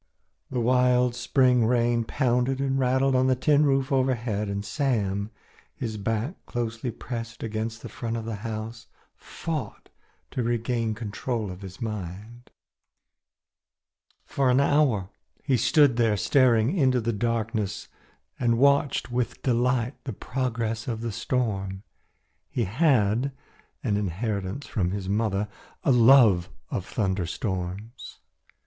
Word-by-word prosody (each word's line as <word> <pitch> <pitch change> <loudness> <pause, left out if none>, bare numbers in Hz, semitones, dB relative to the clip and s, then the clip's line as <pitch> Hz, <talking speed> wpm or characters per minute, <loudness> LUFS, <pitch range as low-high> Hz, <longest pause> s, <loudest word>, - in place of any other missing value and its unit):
The 125 - -2
wild 125 0 +3
spring 125 -1 +3
rain 120 -1 +2
pounded 125 +1 +1
and 135 0 0
rattled 130 +1 +2
on 130 0 +3
the 130 - +3
tin 145 +3 +3
roof 135 0 +1
overhead, 120 -6 0
and 100 +1 -3
Sam, 105 -8 -1 0.5
his 110 -3 -4
back 115 - -3
closely 120 0 -3
pressed 115 0 -6
against 110 0 -4
the - - -5
front 115 -1 -4
of 115 - -5
the 115 -2 -4
house, 110 +1 -6 0.3
fought 160 -4 -6 0.4
to 125 - -2
regain 115 -1 -1
control 110 0 -3
of 90 +2 -10
his 95 -1 -9
mind. 105 +2 -6 1.8
For 135 -2 +1
an 125 +1 +4
hour 140 -9 +2 0.3
he 135 - +2
stood 125 +2 +4
there 115 -3 +3
staring 125 - +3
into 130 -7 +3
the 115 0 -1
darkness 110 -2 -2 0.5
and 115 -2 +2
watched 140 -1 +2
with 120 -1 -2
delight 125 0 +1
the 130 - -4
progress 115 -1 -3
of 115 -2 -3
the 115 -1 -3
storm. 100 -5 -2 0.7
He 120 - -1
had 120 - +2 0.5
an 105 -6 +1
inheritance 100 - -3
from 90 -5 -1
his 95 0 -4
mother 105 0 0 0.4
a - - +3
love 115 -7 +6 0.2
of - - -3
thunderstorms. 95 +2 -3
115 Hz, 130 wpm, -26 LUFS, 105-130 Hz, 1.8 s, love